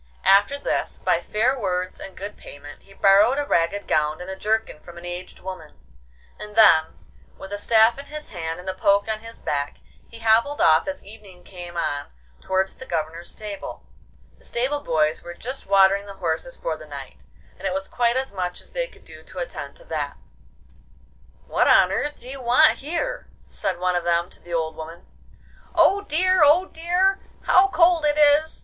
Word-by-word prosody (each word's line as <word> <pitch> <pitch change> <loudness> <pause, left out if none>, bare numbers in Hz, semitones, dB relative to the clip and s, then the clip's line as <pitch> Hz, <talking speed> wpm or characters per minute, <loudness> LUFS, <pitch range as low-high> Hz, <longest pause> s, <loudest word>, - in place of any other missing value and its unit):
After 200 +8 +5
this, 285 - -2
by - - +1
fair 235 +5 0
words 185 -3 -2
and 195 - -8
good 200 +2 -6
payment, 145 +1 -12
he 195 - -21
borrowed 200 +7 +5
a 290 - 0
ragged 170 -1 0
gown 150 +1 +1
and 180 +2 -7
a - - -5
jerkin 215 -4 -1
from 170 +2 -13
an 170 - -10
aged 175 +1 -7
woman, 185 - -9 0.6
and 210 0 -9
then, 160 -8 +5 0.4
with 195 +1 -9
a 205 - -3
staff 225 +3 +4
in 280 - -8
his 300 +1 -7
hand 165 -2 -5
and 180 - -11
a 190 - -1
poke 200 +2 +2
on 220 -1 -2
his 230 +1 -11
back, 145 0 -3 0.3
he 230 - -11
hobbled 230 +6 +2
off 160 0 +4
as 285 0 -5
evening 200 -4 -14
came 175 -2 -9
on 145 -4 -2 0.3
towards 190 0 0
the 260 - -11
Governor's 165 +1 -3
stable. 210 -2 -8 0.5
The - - -18
stable 265 - -1
boys 155 - 0
were 175 0 -9
just 255 +6 -6
watering 195 +1 +4
the 200 - -9
horses 175 +8 -3
for 160 - -3
the 155 0 -12
night, 135 - -10 0.3
and - - -3
it - - -1
was 195 0 -2
quite 240 0 +1
as 265 -4 -2
much 180 -2 -3
as - - -12
they - - -2
could - - -20
do - - -12
to - - -14
attend - - -6
to - - -17
that. - - -4 1.3
'What - - +1
on - - +6
earth 295 0 -1
do - - -14
you 270 +1 -6
want 250 +6 +4
here?' 320 +5 -3 0.2
said 185 -2 -3
one 180 0 0
of 175 - 0
them 170 0 0
to - - -14
the 175 - -14
old 160 -2 -1
woman. 160 +2 -9 0.7
'Oh 400 +1 +4
dear! 370 -1 +2
oh 310 +6 +5
dear! 360 +3 +1 0.2
How 375 +2 +5
cold 340 -2 +3
it 295 0 +1
is! 300 +1 +4
200 Hz, 195 wpm, -23 LUFS, 175-270 Hz, 1.3 s, on